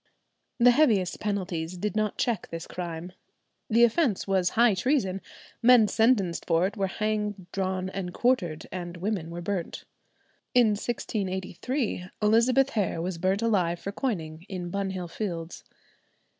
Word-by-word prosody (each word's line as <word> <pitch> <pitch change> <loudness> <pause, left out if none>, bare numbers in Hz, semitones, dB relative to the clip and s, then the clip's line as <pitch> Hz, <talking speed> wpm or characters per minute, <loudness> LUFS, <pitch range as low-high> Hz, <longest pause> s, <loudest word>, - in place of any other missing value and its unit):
The 245 0 +7
heaviest 225 - +3
penalties 180 -4 -3
did 210 +3 -2
not 215 -1 0
check 230 -6 -1
this 165 0 -6
crime. 175 0 -6 0.6
The 230 +1 +5
offence 235 - +2
was 190 -2 +2
high 235 -2 +6
treason; 195 -3 0 0.4
men 240 -2 +7
sentenced 205 - +2
for 165 +1 +3
it 200 +3 -3
were 195 -3 0
hanged, 210 -1 -2
drawn, 185 -1 -1
and 190 -1 -4
quartered, 175 -10 0
and 175 -1 -5
women 185 -3 -2
were 175 +1 -6
burnt. 185 -2 -3 0.7
In 240 -3 +6
1683 205 - -2
Elizabeth 240 +5 +4
Hare 200 -9 -1
was 175 0 -3
burnt 190 +5 +1
alive 180 -7 +1
for 200 - -5
coining 175 - -4
in 180 -3 -5
Bunhill 190 -2 -3
Fields. 170 -3 -5
195 Hz, 140 wpm, -27 LUFS, 175-220 Hz, 0.7 s, The